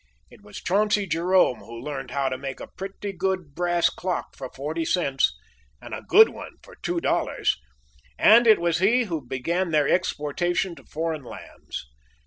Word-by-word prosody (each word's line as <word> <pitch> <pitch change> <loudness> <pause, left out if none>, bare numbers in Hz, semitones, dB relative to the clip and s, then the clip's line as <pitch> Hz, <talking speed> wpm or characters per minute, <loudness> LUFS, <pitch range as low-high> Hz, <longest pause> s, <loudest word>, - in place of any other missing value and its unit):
It - - -17
was 205 -1 -11
Chauncey 205 +2 +1
Jerome 175 - +2
who 115 0 -10
learned 135 +1 -5
how 140 -1 -1
to 130 - -3
make 135 0 -6
a - - -6
pretty 195 +1 -6
good 185 -4 -2
brass 175 +1 +1
clock 180 -1 -4
for 130 -2 -7
forty 155 +5 -4
cents, 140 -6 +1 0.4
and - - -10
a - - -4
good 440 +1 +7
one - - -9
for - - -15
two 350 0 -1
dollars; - - 0 0.6
and 235 +2 +6
it 220 - +8
was 170 -1 +1
he 230 +7 +4
who 165 - -4
began 165 +9 -2
their 150 -3 +2
exportation 175 +1 0
to - - -15
foreign 160 -2 -3
lands. 120 - -9
175 Hz, 170 wpm, -25 LUFS, 145-190 Hz, 0.6 s, it